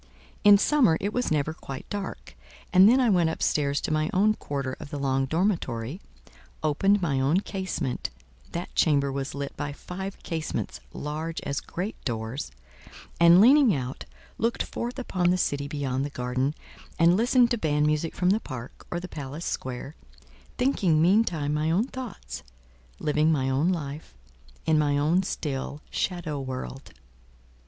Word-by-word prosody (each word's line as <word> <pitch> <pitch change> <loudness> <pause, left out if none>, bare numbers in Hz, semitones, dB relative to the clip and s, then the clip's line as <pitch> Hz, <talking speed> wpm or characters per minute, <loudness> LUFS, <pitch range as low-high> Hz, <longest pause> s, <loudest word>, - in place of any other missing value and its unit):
In 205 -1 +9
summer 235 - +4
it 205 +2 -2
was 250 0 0
never 155 0 0
quite 135 -5 -8
dark, 200 -2 -5 0.4
and 190 +2 +8
then 255 +3 +5
I 255 - +3
went 175 -4 +3
up 160 - -3
stairs 145 -1 +1
to - - -1
my 155 0 +1
own 210 +3 +4
quarter 140 -9 -4
of 150 - -8
the 145 - -5
long 135 -1 0
dormitory, 160 - -1 0.6
opened 195 +6 +2
my 140 -5 +1
own 145 +8 +2
casement 190 -11 -3 0.4
(that 170 +1 -5
chamber 140 -3 +3
was 135 0 -4
lit 140 0 -5
by 145 -1 -3
five 190 +6 -6
casements 160 -3 -3
large 155 +3 -4
as 140 - -2
great 190 +6 -5
doors), 115 +2 -3 0.7
and 170 +1 +8
leaning 250 - +6
out, 130 -1 -5 0.3
looked 230 +3 +1
forth 240 +2 -5
upon 185 -9 0
the 180 - +3
city 145 -5 -1
beyond 140 -2 -2
the 145 - -3
garden, 130 +2 -1 0.4
and 170 +2 +5
listened 240 +3 +4
to 240 - +2
band 150 -3 +1
music 155 +1 0
from 180 0 +2
the 210 - +3
park 130 - -9
or 175 - -2
the 180 - -7
palace 150 +1 -6
square, 130 +4 -4 0.6
thinking 200 - +2
meantime 170 -5 +3
my 150 +1 0
own 185 +8 +2
thoughts, 260 -5 -7 0.6
living 150 +1 +2
my 135 -4 +1
own 145 +7 +2
life, 150 - -5 0.5
in 155 -1 +3
my 145 -1 +2
own 160 +6 +3
still, 145 -5 -4
shadow 170 -6 -2
world. 130 +1 -6
155 Hz, 160 wpm, -27 LUFS, 140-190 Hz, 0.7 s, In